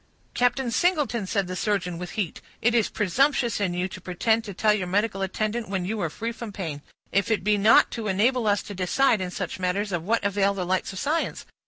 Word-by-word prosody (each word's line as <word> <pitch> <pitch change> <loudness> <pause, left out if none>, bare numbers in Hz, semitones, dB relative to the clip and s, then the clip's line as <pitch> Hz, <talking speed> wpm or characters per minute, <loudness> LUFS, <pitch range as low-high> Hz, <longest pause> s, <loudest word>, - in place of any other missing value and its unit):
"Captain 245 0 +1
Singleton," 285 - +1
said 200 0 0
the 185 +1 -5
surgeon, 180 -4 -1
with 180 0 -6
heat, 195 -7 -2 0.2
"it 235 +1 +2
is 230 -3 +2
presumptuous 240 - +1
in 180 -3 0
you 180 +1 0
to 185 - -10
pretend 220 +6 +1
to 210 - -7
tell 210 +3 +2
your 190 -4 -2
medical 200 +1 0
attendant 215 +4 -2
when 190 -2 -2
you 210 +2 -2
are 170 - 0
free 230 +9 -4
from 230 -2 -7
pain. 165 -8 -5 0.3
If 200 +1 +1
it 210 -5 +1
be 210 +1 +3
not 205 +2 +5
to 225 -3 -4
enable 225 +5 +2
us 205 -1 +2
to 205 - -8
decide 200 +5 +2
in 185 - -2
such 185 -1 -5
matters, 190 +3 -1
of 175 -2 -1
what 220 +7 0
avail 200 0 +1
the 185 -2 -2
lights 185 +1 -1
of 190 - -8
science? 310 - -1
205 Hz, 225 wpm, -25 LUFS, 185-230 Hz, 0.3 s, not